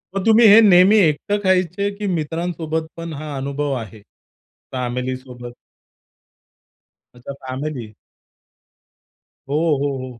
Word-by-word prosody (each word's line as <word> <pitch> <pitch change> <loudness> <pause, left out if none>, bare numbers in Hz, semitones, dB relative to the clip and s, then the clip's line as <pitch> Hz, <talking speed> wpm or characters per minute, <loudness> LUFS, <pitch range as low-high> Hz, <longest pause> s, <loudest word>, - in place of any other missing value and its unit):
मग 195 - -2
तुम्ही 225 +1 +5
हे 210 +2 +8
नेहमी 195 0 +6
एकटं 185 +3 +1
खायचे 185 +1 +1
की 210 -1 -4
मित्रांसोबत 165 -1 -3
पण 165 -1 -6
हा 150 0 -7
अनुभव 140 +1 -3
आहे? 110 -1 -11 0.7
फॅमिलीसोबत? 125 -1 -5 1.6
अच्छा, 125 +3 -9
फॅमिली? 130 -4 -5 1.6
हो, 145 - -1 0.3
हो, 140 -2 -2
हो. 125 -2 -10
155 Hz, 105 wpm, -20 LUFS, 130-180 Hz, 1.6 s, हे